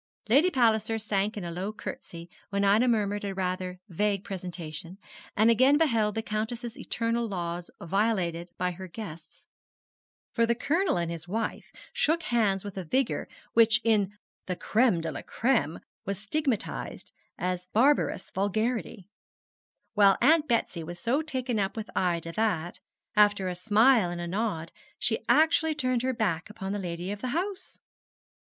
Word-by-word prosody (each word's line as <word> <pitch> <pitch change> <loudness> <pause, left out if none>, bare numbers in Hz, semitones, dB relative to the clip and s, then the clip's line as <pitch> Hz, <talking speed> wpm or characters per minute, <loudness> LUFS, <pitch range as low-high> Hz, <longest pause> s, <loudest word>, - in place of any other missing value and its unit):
Lady 285 +10 +5
Palliser 225 - +2
sank 210 -1 -1
in 200 - -4
a 170 - -4
low 185 +5 -3
curtsey 170 -5 -8 0.2
when 200 0 0
Ida 210 +5 +4
murmured 205 -3 +1
a 195 -1 -3
rather 185 -1 -2
vague 200 +1 0
presentation, 175 -2 -6 0.4
and 220 +2 +6
again 260 +5 +5
beheld 230 -9 +2
the 225 - -1
Countess's 230 +2 -3
eternal 235 -3 -1
laws 175 -3 -4
violated 175 -2 0
by 180 0 0
her 185 +2 -8
guests, 170 -4 -10 0.9
for 230 -1 +3
the 235 - +2
Colonel 325 - +1
and 170 -1 -1
his 165 0 -6
wife 220 +5 -3 0.2
shook 325 +2 +1
hands 205 -5 +1
with 200 -2 -7
a - - -4
vigour 255 +9 0 0.3
which 230 0 +5
in 210 -3 +2 0.3
the 180 - -1
'Crême 215 -4 +2
de 165 - -2
la - - -6
Crême' 230 - 0 0.2
was 200 0 -3
stigmatised 245 - -2 0.3
as 180 0 -2
a - - -45
barbarous 240 -4 +2
vulgarity; 215 0 -1 0.9
while 200 -2 +5
Aunt 310 +4 +4
Betsy 225 -8 0
was 175 +2 -7
so 245 - +1
taken 255 -7 -2
up 195 +2 -1
with 220 +1 -5
Ida 170 -2 0
that, 180 -4 -1 0.4
after 205 -3 +4
a 180 - -4
smile 215 +2 +4
and 175 0 -4
a 175 - -3
nod, 175 -3 -2 0.3
she - - +1
actually 320 0 +4
turned 255 -4 0
her 260 +1 +1
back 190 -8 -1
upon 195 -2 -5
the 205 - -2
lady 175 0 -4
of 205 0 -6
the 255 - -2
house. 380 +1 -4
210 Hz, 160 wpm, -28 LUFS, 180-235 Hz, 0.9 s, and